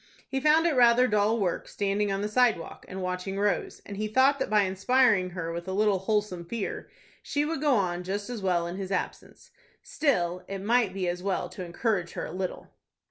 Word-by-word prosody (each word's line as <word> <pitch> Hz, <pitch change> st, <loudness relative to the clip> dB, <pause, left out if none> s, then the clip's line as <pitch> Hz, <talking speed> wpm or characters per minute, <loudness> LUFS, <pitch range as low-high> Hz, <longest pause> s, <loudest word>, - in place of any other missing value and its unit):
He 270 Hz, -, -2 dB
found 305 Hz, +4 st, +4 dB
it 335 Hz, -, +3 dB
rather 245 Hz, 0 st, +5 dB
dull 210 Hz, +1 st, +2 dB
work, 180 Hz, -4 st, -1 dB
standing 200 Hz, 0 st, -1 dB
on 195 Hz, +1 st, -1 dB
the -, -, 0 dB
sidewalk 220 Hz, -6 st, +1 dB
and 190 Hz, 0 st, -6 dB
watching 180 Hz, +2 st, -3 dB
Rose, 200 Hz, -2 st, -1 dB
and 200 Hz, -, -7 dB
he 215 Hz, +1 st, -1 dB
thought 265 Hz, +6 st, +3 dB
that -, -, -1 dB
by 210 Hz, -1 st, +4 dB
inspiring 195 Hz, 0 st, +3 dB
her 170 Hz, -2 st, -5 dB
with 170 Hz, +1 st, -6 dB
a 190 Hz, -, -3 dB
little 205 Hz, -1 st, +2 dB
wholesome 205 Hz, -3 st, -1 dB
fear, 205 Hz, +4 st, -5 dB, 0.3 s
she 290 Hz, 0 st, -1 dB
would 315 Hz, -2 st, -3 dB
go 290 Hz, -4 st, +3 dB
on 180 Hz, -4 st, 0 dB
just 200 Hz, +3 st, -3 dB
as 245 Hz, -4 st, -5 dB
well 180 Hz, -3 st, +1 dB
in 175 Hz, +2 st, -5 dB
his 195 Hz, -1 st, -5 dB
absence. 185 Hz, -, -5 dB, 0.3 s
Still 180 Hz, -, 0 dB
it 195 Hz, -, -4 dB
might 220 Hz, +1 st, +2 dB
be 185 Hz, -1 st, -3 dB
as 175 Hz, 0 st, -2 dB
well 185 Hz, -2 st, -2 dB
to 185 Hz, -, -7 dB
encourage 180 Hz, 0 st, -1 dB
her -, -, -4 dB
a -, -, -7 dB
little. 185 Hz, 0 st, -5 dB
200 Hz, 210 wpm, -27 LUFS, 185-235 Hz, 0.3 s, rather